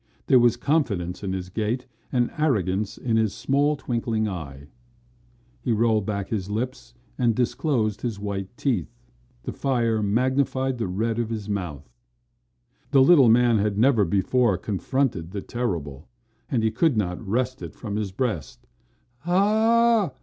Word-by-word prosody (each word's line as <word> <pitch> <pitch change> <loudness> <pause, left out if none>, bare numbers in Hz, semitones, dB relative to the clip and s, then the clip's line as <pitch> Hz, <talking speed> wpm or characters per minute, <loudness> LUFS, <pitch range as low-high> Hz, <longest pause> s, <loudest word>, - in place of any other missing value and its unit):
There 130 - +5
was 120 -1 +4
confidence 100 - -1
in 95 - -2
his 90 -1 -4
gait 110 +6 -2 0.3
and 120 -2 +1
arrogance 105 - 0
in 115 -3 0
his 110 -2 +1
small, 145 +2 +1
twinkling 115 -5 -2
eye. 70 -8 -7 1.0
He 120 - 0
rolled 110 -2 +2
back 100 -2 -3
his 100 -3 -3
lips 125 +5 -4 0.2
and 120 -3 +2
disclosed 120 -3 0
his 115 -5 -3
white 100 -2 -3
teeth. 115 - -1 0.5
The - - -4
fire 115 -5 0
magnified 130 +4 0
the 115 - -1
red 110 +5 -1
of 115 -2 -1
his 110 -3 -4
mouth. 85 -10 -4 1.0
The 135 -1 +5
little 135 -5 +7
man 120 -1 +4
had 100 0 0
never 120 -1 +4
before 100 +3 +2
confronted 100 - -1
the 100 +1 -5
terrible 85 - -4 0.4
and 120 -5 0
he 110 - +2
could 160 -4 +2
not 90 -4 -1
wrest 125 +5 -1
it - - -8
from 105 -4 -5
his 105 -2 -2
breast. 100 - -3 0.5
"Hah!" 215 - +3
115 Hz, 150 wpm, -24 LUFS, 100-130 Hz, 1.0 s, little